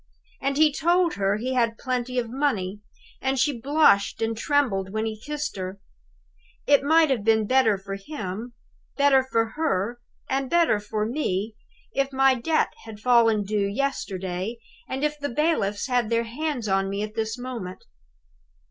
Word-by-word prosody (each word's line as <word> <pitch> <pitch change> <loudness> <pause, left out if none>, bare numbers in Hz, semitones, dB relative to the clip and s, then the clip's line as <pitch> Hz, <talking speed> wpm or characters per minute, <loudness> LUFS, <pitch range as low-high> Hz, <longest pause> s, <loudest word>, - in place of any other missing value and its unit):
And 275 +1 0
he 305 -1 +5
told 345 +3 +2
her 200 +1 0
he 255 +4 -2
had 230 -2 +1
plenty 255 0 -2
of 240 -2 0
money! 220 -7 -1 0.4
And 265 0 0
she 260 -2 +1
blushed 275 -9 +3
and 225 0 -1
trembled 220 -7 0
when 220 +1 -1
he 215 -1 -5
kissed 295 -6 -4
her. 185 +1 -5 0.9
It 285 -1 +5
might 315 +1 +4
have 235 -6 0
been 220 0 +3
better 255 -3 +3
for 195 +1 -7
him, 215 0 -6 0.4
better 280 -2 +5
for 230 -3 0
her, 240 -6 -1 0.3
and 270 0 -1
better 340 -11 +3
for 210 +1 -2
me, 220 -5 -2 0.4
if 275 0 0
my 270 0 +4
debt 285 +6 0
had 220 -2 -9
fallen 230 -2 +4
due 200 0 0
yesterday, 200 -4 -3 0.3
and 265 +2 -3
if 300 0 -1
the 285 0 -3
bailiffs 235 -8 0
had 245 -4 0
their 230 0 +2
hands 250 0 -3
on 195 0 +1
me 200 +1 -2
at 215 0 -6
this 220 +1 -2
moment. 240 -7 -6
235 Hz, 165 wpm, -25 LUFS, 210-275 Hz, 0.9 s, he